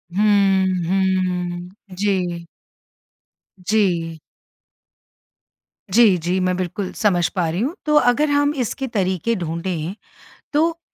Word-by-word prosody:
हुँ, 200 -2 +3 0.2
हुँ। 180 -2 0 0.3
जी। 180 -4 -1 1.2
जी। 175 -6 0 1.7
जी, 220 -5 +6
जी। 175 +3 -1
मैं 185 0 +1
बिल्कुल, 185 +1 -3
समझ 180 -5 +2
पा 180 -3 +1
रही 170 +3 -2
हूँ 285 +9 -1
तो 300 -1 +2
अगर 290 +2 +3
हम 290 0 +2
इसके 265 +4 -4
तरीके 195 0 -1
ढूँढे, 170 0 -3 0.6
तो 330 +3 +1
190 Hz, 105 wpm, -21 LUFS, 175-220 Hz, 1.7 s, जी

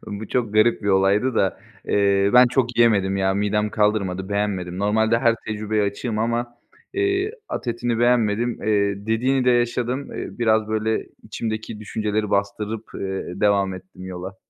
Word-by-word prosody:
bu 105 +1 -6
çok 115 -5 -1
garip 110 +1 +3
bir 100 - -1
olaydı 100 +6 +3
da. 95 -3 0 0.3
Eee, 100 0 +3
ben 125 0 +8
çok 120 -1 0
yiyemedim 100 -5 +3
ya, 95 0 +1
midem 105 +1 0
kaldırmadı, 100 -3 0
beğenmedim. 95 -3 -2
Normalde 110 +3 +2
her 115 -2 +3
tecrübeye 110 0 -1
açığım 105 +2 -2
ama, 120 +1 -1 0.4
eee, 390 +1 0 0.2
at - - -5
etini 120 0 -1
beğenmedim, 120 -1 +1
eee, 100 -1 0
dediğini 125 +4 +1
de 125 - +4
yaşadım. 120 +2 0
Eee, - - -5
biraz 110 -2 +2
,böyle, 110 0 -1 0.2
içimdeki 110 -1 -5
düşünceleri 105 -1 -2
bastırıp, 105 +2 -1
eee, 95 -2 -5
devam 100 -2 +2
ettim 95 0 -12
yola. 95 +1 -7
110 Hz, 155 wpm, -22 LUFS, 100-120 Hz, 0.4 s, ben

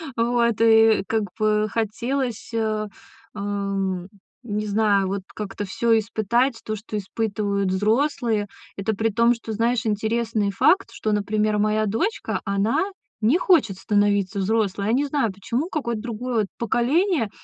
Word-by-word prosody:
Вот, 235 -1 +1
и 225 -2 +5
как 220 -1 0 0.2
бы 215 0 +2
хотелось, 230 +3 -2
э, 215 -2 -1 0.5
эм, 195 -2 -2 0.3
не 210 -2 -3
знаю, 205 -2 +2
вот 195 0 -3
как-то 205 -1 -5
всё 230 +2 +2
испытать, 225 +3 0
то, 215 - -3
что 215 0 -6
испытывают 200 -1 -1
взрослые. 220 +2 +1 0.3
Это 200 +2 -1
при 225 +2 +1
том, 235 +3 +3
что, 230 -1 -8
знаешь, 230 +2 0
интересный 220 0 0
факт, 380 - +3
что, 215 - -2
например, 210 +1 +1
моя 215 +1 +1
дочка, 230 - -1
она 200 +3 +1 0.4
не 235 +11 +3
хочет 265 - +3
становиться 205 -1 +1
взрослой. 200 -1 0
Я 225 - +2
не 275 +4 +2
знаю, 275 -8 0
почему, 235 - -3
какое-то 235 -10 -2
другое 235 -2 -2
поколение. 250 - +1
220 Hz, 140 wpm, -23 LUFS, 205-235 Hz, 0.5 s, и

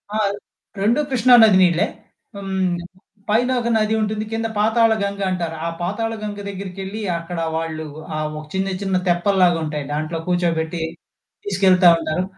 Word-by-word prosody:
ఆ! - - +1 0.6
2 230 +7 +3
కృష్ణా 255 -1 +4
నది 210 -4 +6
నీళ్ళే. 175 -1 +4 0.5
హ్మ్. 190 -2 -1 0.5
పైనొక 245 +2 +1
నది 215 0 +1
ఉంటుంది 215 0 -2
కింద 225 0 -1
పాతాళ 225 +2 +3
గంగ 200 0 -3
అంటారు. 170 -3 -2
ఆ - - 0
పాతాళగంగ 215 +2 -3
దగ్గరికెళ్ళి 195 +2 -6 0.2
అక్కడ 170 +1 -6 0.2
వాళ్ళు 160 -1 -3 0.3
ఆహ్, 155 0 -2
ఒక 155 - -9
చిన్న 190 0 -1
చిన్న 195 -2 0
తెప్పల్లాగా 175 0 +3
ఉంటాయి. 150 -2 -4
దాంట్లో 155 +2 -3
కూర్చోబెట్టి, 170 -2 0 0.6
తీసుకెళ్తా 190 -2 +5
ఉంటారు. 160 +2 -2
190 Hz, 135 wpm, -21 LUFS, 170-215 Hz, 0.6 s, నది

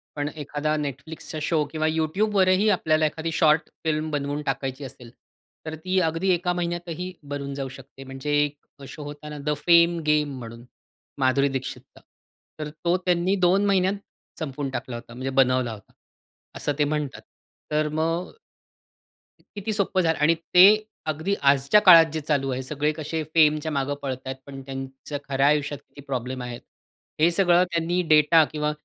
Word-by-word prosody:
पण 145 0 -2
एखादा 150 +2 -2
Netflixचा 155 +3 -7
शो 155 0 +1
किंवा 155 0 -1
YouTubeवरही 185 +5 +2
आपल्याला 155 -3 +1
एखादी 160 +2 -3
शॉर्ट 155 -2 +3
फिल्म 155 0 -1
बनवून 145 0 -2
टाकायची 135 +1 -3
असेल, 125 -2 -12 0.5
तर 155 0 -5
ती 185 +4 -1
अगदी 165 +4 -2
एका 180 +1 0
महिन्यातही 175 0 -4
बनून 140 -1 -5
जाऊ 135 -1 -4
शकते. 135 0 -13
म्हणजे 135 +2 -6
एक 145 -1 -8
शो 150 +3 -9
होता 145 +1 -9
ना 150 - -7
द 150 - +1
फेम 170 0 +5
गेम 150 -3 +1
म्हणून 115 0 -10 0.5
माधुरी 135 +2 +3
दीक्षितचा, 130 - -9 0.6
तर 150 -1 -4
तो 170 +3 -1
त्यांनी 180 +2 +2
2 195 +3 +3
महिन्यात 195 -1 +2 0.5
संपवून 140 -3 -4
टाकला 125 -1 -5
होता 120 0 -10
म्हणजे 130 +2 -4
बनवला 130 -2 +1
होता. 100 - -15 0.6
असं 145 - -2
ते 150 - +4
म्हणतात. 145 -2 -2 0.5
तर 150 0 +1
मग 165 +3 -1 1.2
किती 205 +2 -3
सोप्पं 195 -2 +1
झाल 165 -2 +1
आणि 165 +2 +4
ते 180 +3 +6 0.4
अगदी 160 +6 -1
आजच्या 140 +7 +4
काळात 165 -3 +9
जे 160 - -1
चालू 140 -2 0
आहे, 130 0 -2
सगळे 150 +3 -1
कसे 155 +1 -4
फेमच्या 155 -1 +3
मागे 140 0 -1
पळताय 130 -1 -4
पण 135 -1 -9
त्यांच्या 135 +2 -6
खऱ्या 135 +1 +2
आयुष्यात 145 -1 +1
किती 145 - -14
प्रॉब्लेम 130 -1 -4
आहेत, 120 -1 -7 0.6
हे 160 - +5
सगळं 175 -1 +4
त्यांनी 170 +2 0
डेटा 155 +1 +6
किंवा 150 -1 -1
150 Hz, 160 wpm, -24 LUFS, 140-165 Hz, 1.2 s, काळात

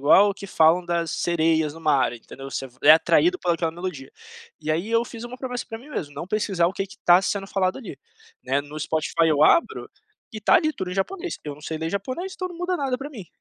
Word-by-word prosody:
igual 170 +8 +6
ao 200 - 0
que 200 - -9
falam 165 0 +4
das 170 -1 -1
sereias 160 -3 +1
no 165 - -11
mar, 145 -6 +2
entendeu? 135 +3 -10
Você 135 +1 -4
v 130 0 -21
é 150 - +9
atraído 345 - +4
pela 175 - +1
aquela 165 -1 -1
melodia. 165 -5 -6 0.5
E, 155 0 -3
aí, 170 +7 -1
eu 230 +1 +2
fiz 230 -1 -9
uma 240 +1 -7
promessa 250 -1 -5
pra 225 - -6
mim 270 +6 -15
mesmo: 145 - -5
não - - -6
pesquisar 190 -3 +1
o 180 - -1
que 195 0 -3
que 195 - -15
tá 175 +1 +7
sendo 195 0 -2
falado 190 -1 0
ali, 195 - -9 0.4
né? 135 +2 0
No 145 +1 -9
Spotify 160 +2 +1
eu 150 -2 +3
abro 335 - +2 0.4
e 215 - -6
tá - - +4
ali 310 0 +4
tudo 185 -10 -5
em - - -4
japonês, 345 - -3
eu 150 - -4
não 145 - -16
sei 160 +1 -5
ler 160 +1 -3
japonês, 255 - -4
então 370 - -4
não 350 - -10
muda 355 +1 -1
nada 270 -3 -1
pra 275 +3 -7
mim, 215 -11 -9
180 Hz, 250 wpm, -24 LUFS, 155-230 Hz, 0.5 s, é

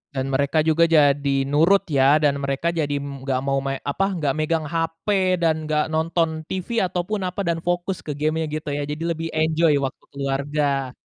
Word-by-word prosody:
Dan 135 +1 -2
mereka 140 +3 +2
juga 165 +1 +3
jadi 140 -3 +3
nurut 165 +8 +3
ya, 140 +1 +5
dan 145 -2 +2
mereka 140 +4 -1
jadi, 150 -4 -1
mmm, 140 -1 -6
nggak 130 -1 0
mau 135 0 +1
main, 135 0 -2
apa, 190 +7 0
nggak 145 -5 0
megang 160 +1 0
HP 165 +1 -3 0.4
dan 160 -1 +1
nggak 155 +1 0
nonton 160 0 -1
TV 190 +5 -2
ataupun, 185 +2 -1
apa, 190 +2 -3
dan 170 -1 -1
fokus 175 +2 -2
ke 150 -2 -6
game 155 +2 0
gitu 150 -1 -4
ya, 145 0 -2
jadi 150 +2 -4
lebih 165 -1 -2
enjoy 160 -1 +3
waktu 130 - -4
keluarga. 140 -1 -1
155 Hz, 185 wpm, -22 LUFS, 140-165 Hz, 0.4 s, ya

